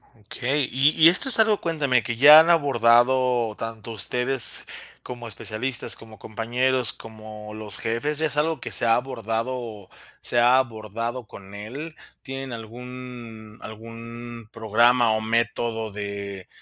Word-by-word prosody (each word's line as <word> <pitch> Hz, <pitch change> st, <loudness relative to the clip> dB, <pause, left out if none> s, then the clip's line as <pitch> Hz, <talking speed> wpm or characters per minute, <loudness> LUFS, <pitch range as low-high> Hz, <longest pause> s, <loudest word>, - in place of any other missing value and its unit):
Okey, 125 Hz, +6 st, -3 dB
y 135 Hz, +3 st, +3 dB
y 160 Hz, +1 st, +6 dB
esto 190 Hz, +10 st, +1 dB
es 245 Hz, -, +4 dB
algo, 220 Hz, -2 st, +3 dB
cuéntame, 145 Hz, -7 st, 0 dB
que 120 Hz, +1 st, -5 dB
ya 150 Hz, +5 st, +9 dB
han 160 Hz, +2 st, +3 dB
abordado 125 Hz, -5 st, +2 dB
tanto 115 Hz, 0 st, -7 dB
ustedes 125 Hz, +4 st, +1 dB, 0.4 s
como 120 Hz, -1 st, -8 dB
especialistas, 115 Hz, +4 st, -1 dB
como 110 Hz, -1 st, -14 dB
compañeros, 120 Hz, +2 st, 0 dB
como 110 Hz, -1 st, -11 dB
los 110 Hz, -1 st, +3 dB
jefes, 120 Hz, +7 st, -2 dB
¿ya 160 Hz, -, +1 dB
es 145 Hz, 0 st, -3 dB
algo 155 Hz, -1 st, 0 dB
que -, -, -8 dB
se -, -, +3 dB
ha 115 Hz, 0 st, +4 dB
abordado 115 Hz, -3 st, -5 dB, 0.3 s
se 120 Hz, -, +1 dB
ha 120 Hz, +2 st, +5 dB
abordado 115 Hz, 0 st, -4 dB
con 100 Hz, 0 st, -13 dB
él? 135 Hz, +11 st, -8 dB, 0.3 s
¿Tienen 135 Hz, -1 st, -7 dB
algún 115 Hz, -1 st, -10 dB
algún 115 Hz, +1 st, -10 dB
programa 115 Hz, +2 st, +2 dB
o 110 Hz, 0 st, 0 dB
método 115 Hz, 0 st, -2 dB
de, 100 Hz, -2 st, -7 dB
120 Hz, 140 wpm, -23 LUFS, 110-130 Hz, 0.4 s, ya